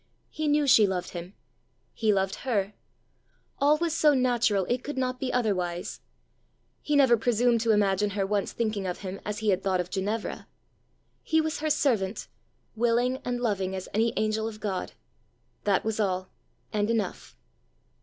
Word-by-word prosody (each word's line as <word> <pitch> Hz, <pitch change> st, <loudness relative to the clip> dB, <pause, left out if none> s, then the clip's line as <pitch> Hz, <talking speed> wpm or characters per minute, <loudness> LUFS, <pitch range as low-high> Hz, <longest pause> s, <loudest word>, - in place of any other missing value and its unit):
He 310 Hz, 0 st, -2 dB
knew 295 Hz, 0 st, +3 dB
she 225 Hz, -6 st, +6 dB
loved 185 Hz, -2 st, -3 dB
him; 175 Hz, +2 st, -8 dB, 0.6 s
he 220 Hz, -2 st, +1 dB
loved 195 Hz, -1 st, 0 dB
her; 210 Hz, -6 st, -1 dB, 0.9 s
all 290 Hz, +2 st, +4 dB
was 330 Hz, 0 st, -1 dB
so 300 Hz, -3 st, +4 dB
natural 240 Hz, -6 st, +2 dB
it 245 Hz, +4 st, -1 dB
could 290 Hz, -1 st, -5 dB
not 255 Hz, -1 st, -1 dB
be 260 Hz, -1 st, -2 dB
otherwise: 185 Hz, -7 st, -1 dB, 0.8 s
he 300 Hz, -, 0 dB
never 265 Hz, -4 st, +6 dB
presumed 235 Hz, 0 st, +2 dB
to 230 Hz, -1 st, +2 dB
imagine 205 Hz, -1 st, +2 dB
her 195 Hz, -, +1 dB
once 200 Hz, 0 st, -1 dB
thinking 215 Hz, -4 st, -2 dB
of 180 Hz, -, -4 dB
him 195 Hz, 0 st, -6 dB
as 210 Hz, 0 st, -3 dB
he -, -, +3 dB
had 185 Hz, 0 st, +1 dB
thought 190 Hz, -1 st, 0 dB
of 180 Hz, 0 st, -3 dB
Ginevra. 205 Hz, +3 st, -3 dB, 0.7 s
He 320 Hz, -, +1 dB
was 315 Hz, 0 st, -1 dB
her 310 Hz, +1 st, -1 dB
servant, 230 Hz, -10 st, 0 dB, 0.5 s
willing 240 Hz, +3 st, +2 dB
and 245 Hz, 0 st, -2 dB
loving 195 Hz, -5 st, -1 dB
as 185 Hz, -, -5 dB
any 225 Hz, +2 st, +2 dB
angel 215 Hz, 0 st, 0 dB
of 215 Hz, -1 st, -7 dB
God: 200 Hz, -4 st, -3 dB, 0.7 s
that 200 Hz, -1 st, +2 dB
was 220 Hz, 0 st, -1 dB
all 185 Hz, -3 st, -1 dB, 0.4 s
and 210 Hz, 0 st, +1 dB
enough! 215 Hz, -, -2 dB
215 Hz, 165 wpm, -27 LUFS, 195-250 Hz, 0.9 s, she